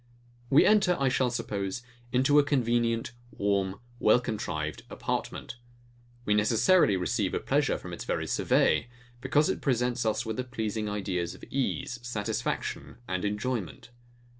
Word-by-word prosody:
We 140 Hz, -, +6 dB
enter, 195 Hz, -4 st, +4 dB
I 135 Hz, -1 st, +3 dB
shall 130 Hz, 0 st, +2 dB
suppose, 115 Hz, -2 st, -3 dB, 0.3 s
into 135 Hz, +4 st, +4 dB
a -, -, +5 dB
convenient, 120 Hz, -4 st, +1 dB, 0.2 s
warm, 100 Hz, -3 st, -1 dB, 0.2 s
well 110 Hz, +3 st, +5 dB
contrived 80 Hz, -10 st, -3 dB
apartment: 120 Hz, -, -4 dB, 0.7 s
We 105 Hz, -, +2 dB
necessarily 110 Hz, -, +4 dB
receive 95 Hz, +2 st, 0 dB
a -, -, +1 dB
pleasure -, -, +1 dB
from -, -, -8 dB
its -, -, -6 dB
very -, -, -2 dB
survey; 120 Hz, -, +2 dB, 0.3 s
because 145 Hz, +3 st, +3 dB
it -, -, -2 dB
presents 125 Hz, -2 st, +1 dB
us 110 Hz, +1 st, 0 dB
with 110 Hz, -1 st, -3 dB
the 130 Hz, -, -1 dB
pleasing 110 Hz, -3 st, -3 dB
ideas 95 Hz, -4 st, -2 dB
of -, -, -16 dB
ease, 130 Hz, -1 st, -2 dB
satisfaction, 110 Hz, -2 st, -3 dB
and 95 Hz, 0 st, -2 dB
enjoyment. 105 Hz, 0 st, -3 dB
115 Hz, 140 wpm, -28 LUFS, 105-125 Hz, 0.7 s, We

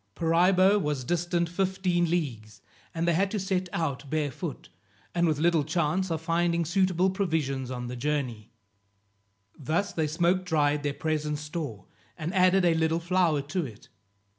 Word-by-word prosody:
Paraibo 185 Hz, +4 st, +4 dB
was 150 Hz, -4 st, -2 dB
distant 175 Hz, +3 st, 0 dB
fifteen 180 Hz, -1 st, 0 dB
leagues, 120 Hz, -11 st, -3 dB, 0.3 s
and 165 Hz, +1 st, -2 dB
they 170 Hz, -, +4 dB
had 190 Hz, +4 st, +2 dB
to 210 Hz, -, -2 dB
set 185 Hz, -1 st, -1 dB
out 145 Hz, -5 st, -3 dB
barefoot, 155 Hz, +1 st, -3 dB, 0.4 s
and 175 Hz, 0 st, +2 dB
with 155 Hz, -2 st, +1 dB
little 165 Hz, 0 st, +3 dB
chance 170 Hz, +4 st, 0 dB
of 165 Hz, -1 st, -1 dB
finding 170 Hz, 0 st, +1 dB
suitable 185 Hz, +1 st, +2 dB
provisions 155 Hz, -9 st, -1 dB
on 125 Hz, -1 st, -4 dB
the 125 Hz, +1 st, -5 dB
journey. 125 Hz, -5 st, -3 dB, 1.1 s
Thus 165 Hz, +9 st, -1 dB
they 160 Hz, -2 st, 0 dB
smoke 175 Hz, +4 st, +1 dB
dried 150 Hz, -4 st, +1 dB
their 145 Hz, -1 st, -2 dB
present 150 Hz, -1 st, -1 dB
store, 150 Hz, -, -6 dB, 0.3 s
and 160 Hz, +4 st, -4 dB
added 185 Hz, 0 st, +4 dB
a 170 Hz, -, +4 dB
little 160 Hz, 0 st, +1 dB
flour 170 Hz, -4 st, +1 dB
to 180 Hz, -, +1 dB
it. 110 Hz, -3 st, -14 dB
165 Hz, 155 wpm, -27 LUFS, 150-180 Hz, 1.1 s, Paraibo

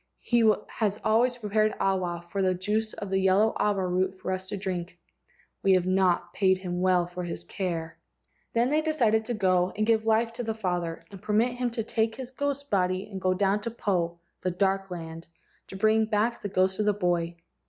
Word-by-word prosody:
He 230 Hz, -2 st, +4 dB, 0.2 s
has 210 Hz, -2 st, -1 dB
always 240 Hz, +3 st, +3 dB
prepared 215 Hz, -1 st, +1 dB
awa* 180 Hz, -3 st, 0 dB
from 195 Hz, +2 st, -1 dB
the 185 Hz, 0 st, +2 dB
juice 215 Hz, +4 st, -1 dB
of 200 Hz, -2 st, -6 dB
the 190 Hz, -, +2 dB
yellow 190 Hz, +3 st, +3 dB
awa 200 Hz, -3 st, +1 dB
root 185 Hz, +1 st, 0 dB
for 185 Hz, -, -4 dB
us 185 Hz, 0 st, -3 dB
to 200 Hz, -, -4 dB
drink. 180 Hz, -2 st, -4 dB, 0.6 s
We 195 Hz, -, +4 dB
have 185 Hz, -1 st, +3 dB
not 185 Hz, -1 st, +2 dB
paid 190 Hz, -2 st, +3 dB
him 180 Hz, -1 st, -4 dB
well 185 Hz, -1 st, +3 dB
for 180 Hz, +1 st, -6 dB
his 175 Hz, -, -5 dB
care." 165 Hz, -4 st, -4 dB, 0.5 s
Then 235 Hz, +2 st, +2 dB
they 305 Hz, +2 st, +2 dB
decided 235 Hz, -9 st, +2 dB
to 240 Hz, -, -2 dB
go 185 Hz, -3 st, +2 dB
and 215 Hz, -, +2 dB
give 220 Hz, -1 st, +3 dB
life 225 Hz, +1 st, +2 dB
to 245 Hz, +1 st, -4 dB
the 220 Hz, -1 st, -2 dB
father, 175 Hz, -5 st, -3 dB
and 195 Hz, -2 st, -10 dB
permit 215 Hz, +4 st, +2 dB
him 245 Hz, 0 st, -1 dB
to 230 Hz, -1 st, -3 dB
take 225 Hz, 0 st, 0 dB
his 260 Hz, -1 st, -7 dB
ghost 285 Hz, +1 st, -3 dB
body 185 Hz, +1 st, 0 dB
and 190 Hz, -1 st, -6 dB
go 185 Hz, 0 st, +2 dB
down 200 Hz, +1 st, +2 dB
into 210 Hz, -, -4 dB
Po, 180 Hz, -7 st, -1 dB, 0.2 s
the 185 Hz, -, 0 dB
dark 195 Hz, +2 st, 0 dB
land, 165 Hz, -2 st, -7 dB, 0.4 s
to -, -, -9 dB
bring 220 Hz, +2 st, +3 dB
back 220 Hz, +2 st, 0 dB
the 205 Hz, -, -4 dB
ghost 190 Hz, 0 st, +1 dB
of 210 Hz, -, +1 dB
the 210 Hz, -, +4 dB
boy. 175 Hz, -3 st, 0 dB
195 Hz, 205 wpm, -27 LUFS, 185-220 Hz, 0.6 s, He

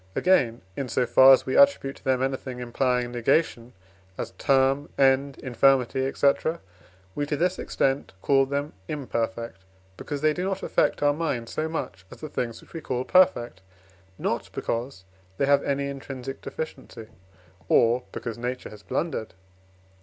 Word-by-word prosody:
Again, 125 Hz, -, +2 dB
in 135 Hz, -2 st, -4 dB
so 125 Hz, -, +1 dB
far 130 Hz, +3 st, +7 dB
as 135 Hz, -, +5 dB
we 130 Hz, -, -2 dB
attribute 280 Hz, -, +4 dB
to -, -, -21 dB
them 130 Hz, -1 st, +1 dB
anything 130 Hz, -1 st, -3 dB
implying 125 Hz, 0 st, 0 dB
negation 120 Hz, 0 st, 0 dB, 0.4 s
as -, -, -4 dB
term, 135 Hz, 0 st, +1 dB
end, 135 Hz, 0 st, +3 dB
infirmity, 130 Hz, +1 st, +2 dB
etc., 140 Hz, +4 st, +1 dB, 0.5 s
we, 145 Hz, +6 st, -2 dB
to 150 Hz, -, -1 dB
this 180 Hz, +3 st, 0 dB
extent, 135 Hz, +1 st, -1 dB
call 135 Hz, -1 st, +3 dB
them 140 Hz, +2 st, -3 dB
imperfect, 115 Hz, -6 st, -3 dB, 0.4 s
because 145 Hz, -1 st, -5 dB
they 155 Hz, 0 st, +3 dB
do 180 Hz, -, -3 dB
not 195 Hz, 0 st, -2 dB
affect -, -, +1 dB
our 145 Hz, 0 st, +4 dB
mind 145 Hz, -7 st, -3 dB
so 155 Hz, +1 st, -2 dB
much 95 Hz, -, -5 dB
as -, -, -12 dB
the 155 Hz, -, -7 dB
things 120 Hz, -4 st, -4 dB
which -, -, -19 dB
we 165 Hz, -, -6 dB
call 125 Hz, -3 st, -2 dB
perfect, 145 Hz, -, +3 dB, 0.6 s
not -, -, -2 dB
because 115 Hz, -4 st, -4 dB, 0.3 s
they -, -, +2 dB
have 140 Hz, 0 st, +4 dB
any 140 Hz, 0 st, -1 dB
intrinsic 135 Hz, -1 st, -7 dB
deficiency, 135 Hz, -6 st, -7 dB, 0.6 s
or 120 Hz, +2 st, +4 dB
because 115 Hz, -1 st, -6 dB
Nature 125 Hz, +1 st, -4 dB
has 105 Hz, -1 st, -12 dB
blundered. 110 Hz, -, -3 dB
135 Hz, 155 wpm, -25 LUFS, 120-145 Hz, 0.6 s, far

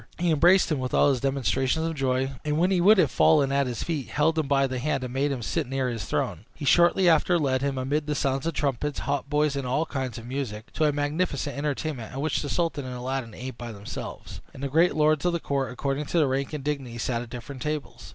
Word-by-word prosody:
He 170 Hz, 0 st, +1 dB
embraced 175 Hz, +4 st, +5 dB
him 150 Hz, -, +1 dB
with 130 Hz, -1 st, -2 dB
all 145 Hz, -, +5 dB
the 130 Hz, -, -2 dB
demonstrations 135 Hz, +3 st, 0 dB
of 165 Hz, -, -1 dB
joy, 135 Hz, -2 st, 0 dB
and 150 Hz, 0 st, 0 dB
when 180 Hz, +4 st, +2 dB
he 180 Hz, -2 st, +3 dB
would 210 Hz, +4 st, +7 dB
have 185 Hz, -, +3 dB
fallen 145 Hz, -4 st, +4 dB
at 140 Hz, -1 st, +2 dB
his 120 Hz, -2 st, -3 dB
feet, 155 Hz, -6 st, -3 dB
held 160 Hz, +2 st, +1 dB
him 155 Hz, -, -1 dB
by 135 Hz, -1 st, +3 dB
the 130 Hz, -1 st, -3 dB
hand, 140 Hz, 0 st, -1 dB
and 125 Hz, -1 st, -5 dB
made 140 Hz, +2 st, +1 dB
him 125 Hz, -4 st, -3 dB
sit 155 Hz, +4 st, -1 dB
near 135 Hz, -1 st, -1 dB
his 115 Hz, -3 st, -4 dB
throne. -, -, -2 dB
He -, -, -6 dB
shortly 175 Hz, +4 st, +4 dB
after 170 Hz, +2 st, +4 dB
led 130 Hz, -5 st, +1 dB
him, 140 Hz, -1 st, -1 dB
amid 145 Hz, +4 st, -1 dB
the 150 Hz, -, -1 dB
sounds 135 Hz, +1 st, 0 dB
of 165 Hz, -, -2 dB
trumpets, 140 Hz, +1 st, -1 dB
hautboys, 145 Hz, +1 st, 0 dB
and 135 Hz, -2 st, -3 dB
all 150 Hz, +6 st, +1 dB
kinds 130 Hz, -7 st, -4 dB
of 115 Hz, -, -9 dB
music, 120 Hz, -4 st, -5 dB
to 155 Hz, -, +1 dB
a 150 Hz, -, +4 dB
magnificent 145 Hz, 0 st, -1 dB
entertainment, 140 Hz, -4 st, -3 dB
at 135 Hz, -, -5 dB
which 155 Hz, 0 st, 0 dB
the 145 Hz, -, -4 dB
sultan 165 Hz, -4 st, -1 dB
and 130 Hz, -1 st, -6 dB
Aladdin 125 Hz, -2 st, -4 dB
ate 130 Hz, -1 st, -7 dB
by 120 Hz, -1 st, -6 dB
themselves, 100 Hz, -1 st, -8 dB
and 135 Hz, -, -8 dB
the 140 Hz, -, -1 dB
great 165 Hz, +5 st, +3 dB
lords 155 Hz, -1 st, +3 dB
of 175 Hz, -1 st, +1 dB
the 170 Hz, -, 0 dB
court, 140 Hz, -4 st, -2 dB
according 135 Hz, +3 st, -2 dB
to -, -, -1 dB
their 155 Hz, -4 st, +4 dB
rank 135 Hz, +1 st, -1 dB
and 150 Hz, -3 st, -4 dB
dignity, 135 Hz, -5 st, -3 dB
sat 120 Hz, 0 st, -1 dB
at 120 Hz, -, -8 dB
different 125 Hz, +2 st, -8 dB
tables. 150 Hz, 0 st, -4 dB
140 Hz, 250 wpm, -26 LUFS, 130-155 Hz, -, would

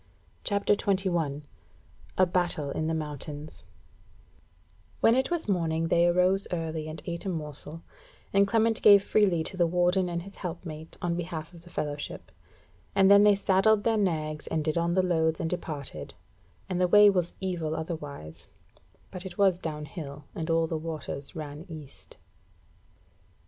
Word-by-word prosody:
CHAPTER 200 Hz, 0 st, +2 dB
21 175 Hz, -8 st, 0 dB, 0.7 s
A 185 Hz, -, +6 dB
Battle 175 Hz, -5 st, 0 dB
in 155 Hz, -, -2 dB
the 165 Hz, -, 0 dB
Mountains 150 Hz, 0 st, -6 dB, 1.4 s
When 225 Hz, -, +5 dB
it 260 Hz, +2 st, +1 dB
was 345 Hz, -6 st, -2 dB
morning 165 Hz, -4 st, 0 dB
they 170 Hz, +1 st, +4 dB
arose 180 Hz, +3 st, +2 dB
early 160 Hz, -2 st, -3 dB
and 155 Hz, 0 st, -6 dB
ate 170 Hz, -1 st, -4 dB
a -, -, 0 dB
morsel; 150 Hz, -1 st, -6 dB, 0.5 s
and 200 Hz, 0 st, +5 dB
Clement 225 Hz, +1 st, +2 dB
gave 200 Hz, -1 st, +8 dB
freely 190 Hz, -7 st, +2 dB
to 190 Hz, -, -5 dB
the 175 Hz, -2 st, +3 dB
Warden 180 Hz, +2 st, +2 dB
and 170 Hz, 0 st, -3 dB
his 195 Hz, +2 st, -12 dB
helpmate 165 Hz, -3 st, -7 dB
on 170 Hz, -1 st, 0 dB
behalf 170 Hz, -1 st, -5 dB
of 170 Hz, -, -13 dB
the 175 Hz, -, -16 dB
fellowship; 145 Hz, -3 st, -5 dB, 0.6 s
and 195 Hz, 0 st, +6 dB
then 200 Hz, 0 st, +8 dB
they 210 Hz, -1 st, +6 dB
saddled 200 Hz, +2 st, +3 dB
their 230 Hz, -1 st, +2 dB
nags, 155 Hz, -7 st, -1 dB
and 160 Hz, -1 st, -1 dB
did 155 Hz, -, 0 dB
on 170 Hz, 0 st, +1 dB
the 185 Hz, -, +3 dB
loads 160 Hz, -3 st, +1 dB
and 165 Hz, -, -2 dB
departed; 155 Hz, -5 st, -5 dB, 0.5 s
and 185 Hz, -1 st, -1 dB
the 180 Hz, -, +4 dB
way 210 Hz, +3 st, +8 dB
was 180 Hz, -4 st, +2 dB
evil 170 Hz, -5 st, -2 dB
otherwise, 145 Hz, -, -6 dB, 0.6 s
but 185 Hz, -2 st, -7 dB
it 190 Hz, 0 st, -8 dB
was 190 Hz, -3 st, +3 dB
down 150 Hz, -3 st, -4 dB
hill, 145 Hz, -2 st, -8 dB
and 160 Hz, 0 st, -4 dB
all 165 Hz, 0 st, +3 dB
waters 155 Hz, -3 st, -3 dB
ran 150 Hz, -1 st, -6 dB
east. 155 Hz, -4 st, -11 dB
170 Hz, 160 wpm, -28 LUFS, 155-190 Hz, 1.4 s, gave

